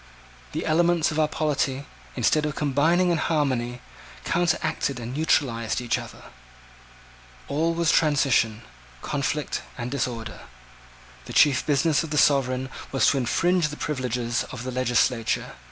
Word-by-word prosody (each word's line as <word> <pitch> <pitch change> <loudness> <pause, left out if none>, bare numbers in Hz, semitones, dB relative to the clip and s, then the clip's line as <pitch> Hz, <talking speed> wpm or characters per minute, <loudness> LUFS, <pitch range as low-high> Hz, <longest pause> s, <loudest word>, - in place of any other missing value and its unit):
The 155 - -3
elements 170 0 +2
of 155 - -2
our 155 - +3
polity, 145 -3 -1 0.3
instead 145 +5 +2
of 150 - -4
combining 160 +5 +2
in 170 - +1
harmony, 130 -7 -1 0.4
counteracted 165 -5 0
and 120 +1 -6
neutralised 120 -7 +1
each 120 -1 -1
other - - -11 1.2
All 160 +4 0
was 165 -2 +2
transition, 135 -7 +2 0.4
conflict, 145 +1 -2 0.2
and 120 0 -4
disorder. 120 -4 -3 0.9
The - - -8
chief 145 -2 +4
business 150 +1 +2
of 160 - -6
the 150 - -2
sovereign 130 -2 +2 0.2
was 135 - +2
to 140 - -1
infringe 170 +7 +1
the 150 - -8
privileges 125 -4 -2
of 125 -2 -7
the 130 - -4
legislature. 125 -2 0
140 Hz, 135 wpm, -25 LUFS, 125-155 Hz, 1.2 s, chief